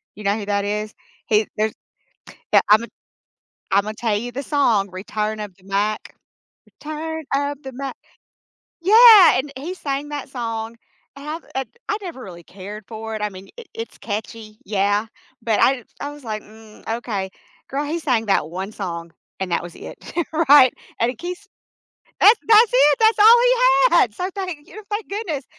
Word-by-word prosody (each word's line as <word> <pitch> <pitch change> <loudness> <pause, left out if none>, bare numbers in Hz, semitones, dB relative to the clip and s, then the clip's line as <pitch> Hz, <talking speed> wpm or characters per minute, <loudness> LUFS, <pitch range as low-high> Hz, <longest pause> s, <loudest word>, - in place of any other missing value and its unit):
You 210 - -10
know 200 +2 +2
who 205 - -5
that 200 0 0
is? 210 +1 -3 0.3
He 215 0 +2
there's 215 0 0 0.8
yeah, - - +7
I'm 215 +2 +6
a - - -7 0.8
I'm 200 +2 +2
a 215 - -3
tell 220 -3 0
you 245 +3 -5
the 275 +3 -5
song, 230 -10 +1
Return 210 +3 -4
of 205 -3 -7
the 185 - -25
Mac. 205 +2 -2 0.5
Return 315 +1 -6
of 285 0 -2
the 265 - -7
Mac. 275 +1 -6 0.9
Yeah! 430 - +8
And 275 +2 -3
he 330 +7 -5
sang 285 -4 -4
that 290 -2 -5
song 230 -2 -5 0.4
I - - -10
have 310 +3 -6
eh 265 - 0 0.3
I 415 - 0
never 335 -9 -8
really 175 -3 -11
cared 200 +3 -10
for 220 0 -6
it, 215 - -5
I 210 - -1
mean, 190 0 -12
i - - -8
it's 455 0 -7
catchy, 215 0 -6
yeah, 205 +1 0 0.3
but 225 -2 0
I 260 -3 +3 0.2
I 285 +1 -4
was 290 -2 -13
like, 215 -1 -4
"Mm, 220 0 -17
okay." 200 -6 -4 0.4
Girl, 285 +2 -2
he 330 +3 -3
sang 250 -8 0
that 160 -5 +1
one 190 +4 -5
song, 170 -4 -6 0.3
and 185 -2 -4
that - - 0
was 175 - -10
it. - - -10 0.5
Right? 275 -3 +8 0.3
And 230 +1 +2
he - - -12
Keith's 360 +4 -7 0.7
that's 430 +4 +7
that's 440 +1 +7
it! 285 +2 +5
That's 445 0 +4
all 450 +3 +9
he - - +4 0.4
had! - - +3
So 365 0 -3
thank 365 -7 -6
y 385 - -14
thank 415 +1 -3
goodness, 365 - -4
235 Hz, 185 wpm, -21 LUFS, 210-300 Hz, 0.9 s, all